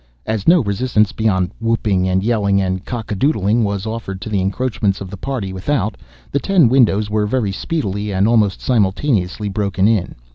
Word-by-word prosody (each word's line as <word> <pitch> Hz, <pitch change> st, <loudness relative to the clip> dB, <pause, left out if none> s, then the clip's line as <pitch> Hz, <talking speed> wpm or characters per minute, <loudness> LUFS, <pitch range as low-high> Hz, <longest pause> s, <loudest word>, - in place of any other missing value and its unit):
As 110 Hz, -3 st, -3 dB
no 170 Hz, -4 st, +6 dB
resistance, 105 Hz, 0 st, +1 dB
beyond 95 Hz, -5 st, 0 dB
whooping 105 Hz, -5 st, 0 dB
and 95 Hz, +1 st, +1 dB
yelling 100 Hz, -3 st, +2 dB
and 95 Hz, -1 st, -1 dB
cock 115 Hz, -1 st, -6 dB
a -, -, 0 dB
doodling, 110 Hz, -2 st, +1 dB
was 100 Hz, -1 st, -2 dB
offered 110 Hz, -4 st, -5 dB
to 110 Hz, -, -6 dB
the 100 Hz, -3 st, 0 dB
encroachments 100 Hz, 0 st, -1 dB
of 95 Hz, -2 st, -8 dB
the -, -, -5 dB
party 105 Hz, -3 st, -4 dB
without, 110 Hz, +2 st, -1 dB, 0.4 s
the 140 Hz, -, +1 dB
ten 180 Hz, -4 st, +3 dB
windows 110 Hz, -5 st, +3 dB
were 105 Hz, -1 st, +1 dB
very 110 Hz, -3 st, 0 dB
speedily, 105 Hz, -, -3 dB
and 95 Hz, +2 st, +2 dB
almost 110 Hz, -4 st, +2 dB
simultaneously, 105 Hz, -3 st, 0 dB
broken 100 Hz, -1 st, 0 dB
in. 110 Hz, -5 st, 0 dB
105 Hz, 180 wpm, -18 LUFS, 95-115 Hz, 0.4 s, no